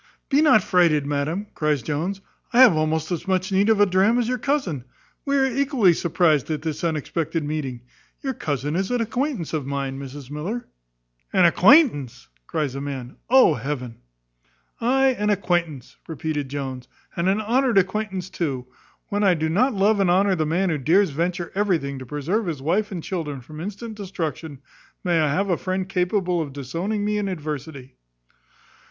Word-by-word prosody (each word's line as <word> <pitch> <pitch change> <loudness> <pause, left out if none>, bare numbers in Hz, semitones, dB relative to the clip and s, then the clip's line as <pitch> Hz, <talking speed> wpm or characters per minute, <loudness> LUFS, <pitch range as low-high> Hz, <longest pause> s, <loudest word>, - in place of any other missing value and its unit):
"Be 285 +1 +4
not 295 -9 +5
frighted, 165 -6 +3
madam," 145 +7 -2
cries 150 -4 0
Jones, 170 - -3 0.3
"I 245 - +6
have 240 -10 +8
almost 155 +1 0
as 175 0 -3
much 185 +1 0
need 195 +3 +3
of 220 -2 +4
a 205 - +7
dram 195 +5 +3
as 240 -2 +1
your 250 0 -1
cousin. 245 - -1 0.4
We 280 0 +1
are 270 - +4
equally 265 - +3
surprized 165 -4 +1
at 155 -2 -3
this 160 0 -4
unexpected 165 0 -2
meeting. 145 -5 -4 0.4
Your 270 -1 -1
cousin 145 - -3
is 190 +1 -1
an 245 - 0
acquaintance 235 - -2
of 150 -4 -2
mine, 135 -1 -3
Mrs 140 0 -9
Miller." 185 +12 -4 0.6
"An 185 - +4
acquaintance!" 170 - +4 0.2
cries 150 -4 -2
the 135 - -5
man. 135 -3 -6
"Oh, 255 -9 +6
heaven!" 125 -2 -5 0.8
"Ay, 265 +3 +3
an 210 0 +1
acquaintance," 175 - -1
repeated 155 -3 -3
Jones, 130 -2 -5 0.3
"and 170 +2 +1
an 200 +2 +2
honoured 240 +2 +1
acquaintance 190 -1 0
too. 135 -7 -3 0.4
When 205 +1 0
I 190 -3 +4
do 160 0 -1
not 235 +9 +2
love 200 +2 +3
and 195 -2 +3
honour 190 +2 +3
the 160 -4 0
man 180 +3 +1
who 150 - -1
dares 170 +6 +3
venture 175 +3 -2
everything 170 -9 0
to 130 - -9
preserve 165 - -2
his 160 -5 -3
wife 190 +10 0
and 175 -4 -5
children 155 -7 -4
from 150 +5 -10
instant 210 +4 -6
destruction, 160 -7 -5 0.4
may 175 -2 +2
I 155 -2 +2
have 195 +5 0
a 175 - +2
friend 185 0 -2
capable 180 -1 0
of 145 -4 -5
disowning 170 +10 -3
me 210 0 0
in 205 - -2
adversity!" 150 -6 -6
175 Hz, 175 wpm, -23 LUFS, 145-205 Hz, 0.8 s, have